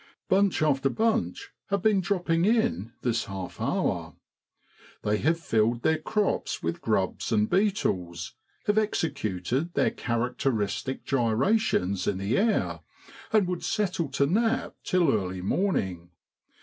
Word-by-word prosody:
Bunch 195 Hz, -3 st, +3 dB
after 135 Hz, -3 st, +2 dB
bunch 225 Hz, -, 0 dB, 0.2 s
have 200 Hz, -2 st, -1 dB
been 210 Hz, -3 st, +4 dB
dropping 175 Hz, -3 st, 0 dB
in 220 Hz, -, +1 dB
this 120 Hz, -2 st, 0 dB
half 95 Hz, -2 st, -7 dB
hour. -, -, -1 dB, 0.9 s
They 105 Hz, 0 st, +1 dB
have 165 Hz, +1 st, +2 dB
filled 115 Hz, -4 st, +1 dB
their 160 Hz, 0 st, +2 dB
crops 210 Hz, -2 st, -1 dB
with 85 Hz, +1 st, -2 dB
grubs 100 Hz, -2 st, 0 dB
and 105 Hz, -1 st, +3 dB
beetles, 95 Hz, -, 0 dB, 0.3 s
have 210 Hz, +1 st, +3 dB
executed 140 Hz, -, -1 dB
their -, -, +3 dB
characteristic 120 Hz, -1 st, -2 dB
gyrations 120 Hz, -, +1 dB
in 95 Hz, -, +1 dB
the 100 Hz, +3 st, -1 dB
air, 215 Hz, +2 st, +1 dB, 0.5 s
and 215 Hz, -3 st, +4 dB
would 180 Hz, -1 st, -3 dB
settle 185 Hz, -8 st, -1 dB
to 140 Hz, -, +3 dB
nap 225 Hz, -, +1 dB
till 175 Hz, -6 st, +3 dB
early 95 Hz, -3 st, -2 dB
morning. 95 Hz, -, -1 dB
140 Hz, 125 wpm, -27 LUFS, -, 0.9 s, been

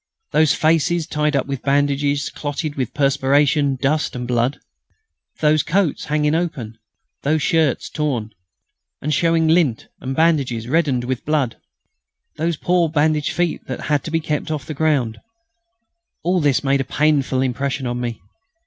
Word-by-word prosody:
Those 155 Hz, -1 st, +4 dB
faces 165 Hz, +1 st, +2 dB
tied 150 Hz, -2 st, 0 dB
up 140 Hz, -, +1 dB
with 135 Hz, -2 st, -4 dB
bandages 140 Hz, 0 st, +1 dB
clotted 145 Hz, +1 st, -4 dB
with 130 Hz, -5 st, -3 dB
perspiration, 140 Hz, 0 st, +2 dB
dust, 140 Hz, +4 st, 0 dB
and 125 Hz, -1 st, -4 dB
blood; 120 Hz, +3 st, 0 dB, 0.8 s
those 155 Hz, 0 st, +4 dB
coats 180 Hz, 0 st, 0 dB
hanging 150 Hz, 0 st, +1 dB
open; 135 Hz, -10 st, -3 dB, 0.4 s
those 150 Hz, +1 st, +1 dB
shirts 160 Hz, -5 st, +1 dB
torn, 130 Hz, -8 st, -2 dB, 0.7 s
and 150 Hz, +2 st, -2 dB
showing 165 Hz, 0 st, +2 dB
lint 155 Hz, -8 st, +2 dB
and 135 Hz, +1 st, -4 dB
bandages 140 Hz, -8 st, +1 dB
reddened 140 Hz, -4 st, +1 dB
with 125 Hz, 0 st, -3 dB
blood; 145 Hz, -6 st, 0 dB, 0.8 s
those 165 Hz, 0 st, -1 dB
poor 175 Hz, -1 st, +2 dB
bandaged 150 Hz, -1 st, +1 dB
feet 175 Hz, -1 st, -1 dB
that 130 Hz, -, -5 dB
had 145 Hz, -3 st, 0 dB
to -, -, -4 dB
be 165 Hz, 0 st, +1 dB
kept 150 Hz, -2 st, -3 dB
off 150 Hz, -4 st, -3 dB
the 155 Hz, -, -5 dB
ground 140 Hz, -7 st, 0 dB, 1.0 s
all 180 Hz, +1 st, +1 dB
this 145 Hz, -2 st, +2 dB
made 135 Hz, 0 st, +2 dB
a 135 Hz, -, -7 dB
painful 140 Hz, -4 st, +2 dB
impression 135 Hz, +1 st, -2 dB
on 120 Hz, 0 st, -2 dB
me. 120 Hz, -2 st, -4 dB
145 Hz, 150 wpm, -20 LUFS, 130-155 Hz, 1.0 s, Those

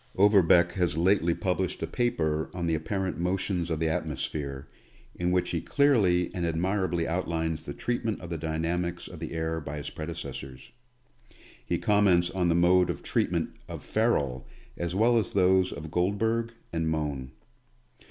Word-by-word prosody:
Overbeck 95 Hz, -4 st, +5 dB
has 90 Hz, -5 st, 0 dB
lately 85 Hz, -1 st, +3 dB
published 90 Hz, -2 st, -1 dB
a -, -, +1 dB
paper 80 Hz, -7 st, 0 dB
on 90 Hz, -1 st, -2 dB
the 85 Hz, -, +1 dB
apparent 85 Hz, +2 st, -2 dB
motions 90 Hz, -1 st, -1 dB
of 80 Hz, -2 st, -1 dB
the 80 Hz, -, +1 dB
atmosphere, 75 Hz, -3 st, -3 dB, 0.5 s
in 90 Hz, 0 st, -1 dB
which 90 Hz, 0 st, +1 dB
he 85 Hz, -, -1 dB
clearly 100 Hz, -8 st, +3 dB
and 90 Hz, -, -3 dB
admirably 85 Hz, +1 st, 0 dB
outlines 80 Hz, -2 st, -2 dB
the -, -, -4 dB
treatment 115 Hz, -3 st, -2 dB
of 85 Hz, -, -9 dB
the 85 Hz, -, -2 dB
dynamics 85 Hz, +2 st, -2 dB
of -, -, -10 dB
the -, -, -5 dB
air 80 Hz, 0 st, -2 dB
by 75 Hz, 0 st, -6 dB
his 75 Hz, -, -6 dB
predecessors. 70 Hz, -5 st, -7 dB, 0.9 s
He -, -, -1 dB
comments 95 Hz, -4 st, +3 dB
on 90 Hz, -2 st, +1 dB
the 85 Hz, -, +3 dB
mode 90 Hz, +1 st, +4 dB
of -, -, -4 dB
treatment -, -, 0 dB, 0.2 s
of -, -, -7 dB
Ferrel, 70 Hz, -, 0 dB, 0.3 s
as 85 Hz, 0 st, -3 dB
well 115 Hz, +3 st, +4 dB
as 105 Hz, -, -3 dB
those 95 Hz, -1 st, +3 dB
of 75 Hz, +1 st, -7 dB
Guldberg 110 Hz, +6 st, 0 dB, 0.2 s
and 80 Hz, -1 st, 0 dB
Mohn. 70 Hz, -5 st, -3 dB
85 Hz, 160 wpm, -28 LUFS, 80-95 Hz, 0.9 s, Overbeck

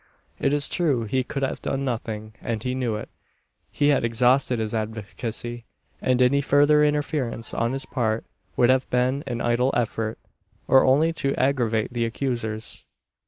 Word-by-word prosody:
It -, -, +1 dB
is 145 Hz, 0 st, +2 dB
true 145 Hz, -10 st, +1 dB
he 130 Hz, +4 st, 0 dB
could 135 Hz, +2 st, -4 dB
have 135 Hz, -, -2 dB
done 135 Hz, 0 st, -2 dB
nothing, 110 Hz, -3 st, -4 dB
and 115 Hz, -2 st, -3 dB
he 125 Hz, -, -1 dB
knew 125 Hz, -4 st, -1 dB
it. 105 Hz, -, -6 dB, 0.6 s
He 145 Hz, -1 st, +1 dB
had 140 Hz, -, +3 dB
exhausted 125 Hz, +2 st, +2 dB
his 110 Hz, -1 st, -2 dB
advocacy; 115 Hz, +2 st, -4 dB, 0.4 s
and 130 Hz, 0 st, +3 dB
any 140 Hz, +3 st, +3 dB
further 145 Hz, +2 st, +4 dB
interference 145 Hz, -6 st, -1 dB
on 115 Hz, +2 st, 0 dB
his 135 Hz, 0 st, -2 dB
part 115 Hz, -3 st, -1 dB, 0.3 s
would 120 Hz, +1 st, +5 dB
have 130 Hz, 0 st, +1 dB
been 130 Hz, +3 st, +1 dB
an 120 Hz, -2 st, -3 dB
idle 120 Hz, +2 st, +2 dB
effort, 115 Hz, -2 st, -2 dB, 0.5 s
or 135 Hz, -, +6 dB
only 150 Hz, +5 st, +3 dB
to 140 Hz, -4 st, -1 dB
aggravate 120 Hz, -4 st, +1 dB
the 120 Hz, -1 st, 0 dB
accusers. 115 Hz, -3 st, -3 dB
125 Hz, 165 wpm, -24 LUFS, 115-135 Hz, 0.6 s, or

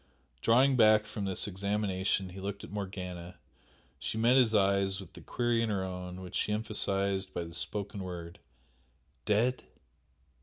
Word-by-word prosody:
Drawing 130 Hz, +4 st, +5 dB
back 110 Hz, -2 st, +6 dB
from 105 Hz, -1 st, -4 dB
this 95 Hz, +1 st, 0 dB
examination 95 Hz, -1 st, 0 dB
he 90 Hz, +2 st, -9 dB
looked 100 Hz, +1 st, -5 dB
at -, -, -9 dB
Morgana, 90 Hz, -3 st, -6 dB, 0.6 s
she 95 Hz, -, -3 dB
met 120 Hz, +3 st, +4 dB
his 120 Hz, -4 st, +4 dB
eyes 100 Hz, -1 st, +3 dB
with 95 Hz, -4 st, -11 dB
the -, -, -11 dB
query 120 Hz, -1 st, 0 dB
in 115 Hz, -, 0 dB
her 100 Hz, -3 st, 0 dB
own 90 Hz, 0 st, -6 dB
which 90 Hz, -1 st, -8 dB
she -, -, 0 dB
emphasised 100 Hz, -3 st, -1 dB
by 85 Hz, -, -1 dB
the 85 Hz, 0 st, -9 dB
spoken 100 Hz, +3 st, -3 dB
word 85 Hz, -2 st, -7 dB, 0.9 s
"Dead?" 115 Hz, +5 st, +2 dB
100 Hz, 155 wpm, -31 LUFS, 95-110 Hz, 0.9 s, back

